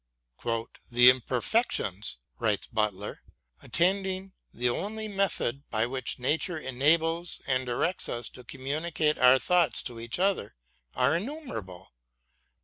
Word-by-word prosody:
" 115 0 -4
The 125 +1 +8
imperfections," 125 - 0 0.2
writes 105 -4 +1
Butler, 105 -3 -2 0.4
attending 190 +1 0 0.2
the 125 +1 -1
only 215 - -2
method 195 - -1
by 110 0 +1
which 130 +2 -2
Nature 160 +7 0
enables 160 +5 +1
and 130 -3 0
directs 145 +9 0
us 120 0 -3
to 125 - -13
communicate 150 +5 -1
our 125 +1 +7
thoughts 175 +3 +2
to 120 -3 -5
each 115 0 -2
other 185 - 0 0.4
are 130 +5 +3
innumerable. 165 - -6
135 Hz, 120 wpm, -28 LUFS, 120-175 Hz, 0.4 s, The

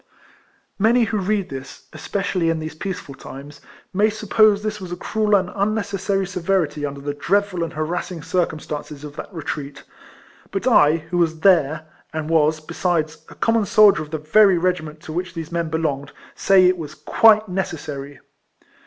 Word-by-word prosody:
Many 230 +4 +4
who 220 -1 -1
read 200 0 -1
this, 135 0 -9
especiallj^ 190 -4 -2
in 165 - +1
these 155 0 -5
peaceful 170 -3 -6
times, 140 +2 -11 0.3
may 205 +3 +3
suppose 215 -1 +3
this 215 -1 -3
was 180 -2 -7
a - - -2
cruel 215 +3 +1
and 185 -2 +1
unnecessary 200 -1 -1
severity 175 -5 -1
under 140 0 -7
the 145 +1 -3
dreadful 190 +3 0
and 165 - -5
harassing 165 +1 -3
circumstances 155 -4 -3
of 150 -1 -9
that - - -7
retreat; 145 -4 -6 0.7
but 195 - -3
I, 160 -11 +5
who 175 - +1
was 160 -2 0
there, 160 -4 +3 0.3
and 160 0 -4
was, 155 -1 +3
besides, 160 0 -2
a - - -13
com 230 - +1
mon 225 -2 +2
soldier 210 -3 +6
of 155 - -7
the 155 - -3
very 185 +5 +4
regiment 165 -4 -2
to 155 - -8
which 180 +1 -4
these 165 0 -6
men 170 -1 -1
belonged, 150 -3 -2 0.2
say 190 -1 +4
it 180 0 +3
was 155 -3 -7
quite 220 -1 +4
necessary. 145 -7 -5
175 Hz, 170 wpm, -21 LUFS, 155-200 Hz, 0.7 s, soldier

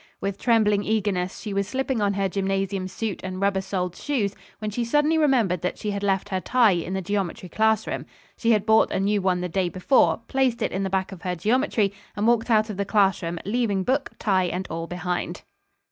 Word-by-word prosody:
With 195 0 -3
trembling 210 -4 +3
eagerness 200 -4 -1
she 210 - -5
was 200 0 0
slipping 265 0 -1
on 200 -1 +1
her 195 -1 +1
gymnasium 195 0 -1
suit 200 +1 -4
and 185 0 -5
rubber 195 -1 +1
soled 180 -2 -3
shoes, 220 -9 -1 0.2
when 215 0 -4
she 235 +4 -1
suddenly 295 +6 +2
remembered 235 - +2
that 180 - -2
she 210 - -3
had 200 0 -3
left 195 0 0
her 190 -2 -1
tie 240 -2 +4
in 175 +1 -2
the 190 - -2
geometry 190 -2 -2
classroom. 220 +1 0 0.3
She 230 - -1
had 210 -3 +3
bought 220 0 +5
a - - -1
new 200 +1 +1
one 185 -1 +1
the 180 - -2
day 180 +1 0
before, 185 +10 +2
placed 265 -3 +1
it - - -1
in 190 - -2
the 195 - -1
back 190 0 -1
of 185 -3 -9
her 180 -1 -2
geometry 215 - +1 0.2
and 205 +1 -1
walked 235 0 +2
out 215 -1 +3
of 195 - -7
the 200 - 0
classroom, 190 -5 +1
leaving 205 -2 0
book, 265 +6 0
tie 190 -3 +2
and 180 +2 -3
all 165 +1 -4
behind. 180 0 -3
200 Hz, 215 wpm, -24 LUFS, 185-220 Hz, 0.3 s, bought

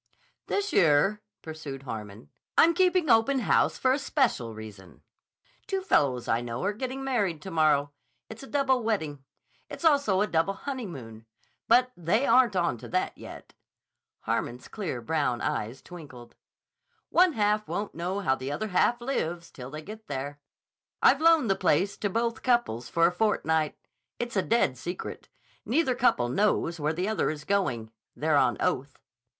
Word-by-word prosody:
"This 405 +1 -1
year," 170 +6 +4 0.2
pursued 155 -4 -7
Harmon, 105 - -8 0.3
"I'm 335 +1 +6
keeping 365 -2 +2
open 250 +3 +4
house - - +2
for 260 - +2
a 275 - 0
special 240 - 0
reason. 105 -4 -12 0.6
Two 385 -1 -1
fellows 135 - +1
I 115 +1 +1
know 120 +3 -5
are 200 +2 0
getting 260 +4 -5
married 205 - 0
to 190 - -7
morrow. 150 -3 +2 0.4
It's 220 +1 -10
a 270 - -10
double 270 -3 +1
wedding. 160 - -2 0.5
It's - - -7
also 280 -11 +3
a - - +3
double 170 +1 0
honeymoon. 145 - -7 0.4
But 250 +2 +4
they 180 - +1
aren't 250 -7 +4
onto 170 -11 -1
that 185 +1 -1
yet." - - -11 0.7
Harmon's 120 +1 -3
clear 170 - -5
brown 125 -2 0
eyes 115 +4 -3
twinkled. 145 -9 -12 0.8
"One 360 -1 +4
half 210 -2 +1
won't 205 0 -3
know 180 +4 -3
how 130 - +2
the 135 +1 -4
other 215 +9 -3
half 235 +6 +2
lives 175 -10 -3
till 125 -1 -9
they 155 +2 -8
get 215 +4 -10
there. 140 +1 -5 0.6
I've 280 - +5
loaned 325 -5 +5
the 195 - +2
place 185 +3 +1
to 205 - -1
both 230 +2 -1
couples 240 - 0
for 165 0 +3
a - - +4
fortnight. 160 -6 0 0.4
It's 240 -1 -4
a 190 - +3
dead 185 - +1
secret. 175 +6 -6 0.3
Neither 265 +1 +1
couple 240 - +2
knows 170 +2 0
where 150 +1 0
the 180 +4 -2
other 220 - 0
is 150 -1 -5
going. 130 - -1 0.2
They're 155 0 +1
on 125 -4 +3
oath." 135 +1 -1
180 Hz, 160 wpm, -27 LUFS, 140-235 Hz, 0.8 s, I'm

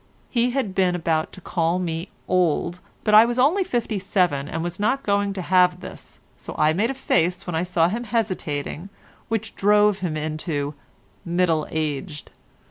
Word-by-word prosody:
He 240 0 +2
had 245 -6 -2
been 185 -2 +2
about 160 -2 0
to 185 - -11
call 170 +1 0
me 170 0 -3 0.2
old, 180 -1 +1 0.2
but 210 - +1
I 215 +1 +10
was 240 +1 -1
only 305 +10 +3
fifty 235 - -2
seven, 180 -7 0
and 165 0 -3
was 175 +2 -5
not 260 +7 +1
going 200 0 +1
to 190 -2 -5
have 180 0 +3
this, - - -11 0.2
so - - -9
I 155 +1 +3
made 210 +8 +1
a 270 - -3
face 180 -7 0
when 175 - -4
I 160 - 0
saw 175 -2 +2
him 230 +7 -3
hesitating, 185 -7 -2 0.4
which 220 -1 -3
drove 210 0 +3
him 170 -4 -2
into 155 -1 -3 0.5
"middle 170 -3 +1
aged." 150 0 -4
180 Hz, 175 wpm, -23 LUFS, 165-210 Hz, 0.5 s, I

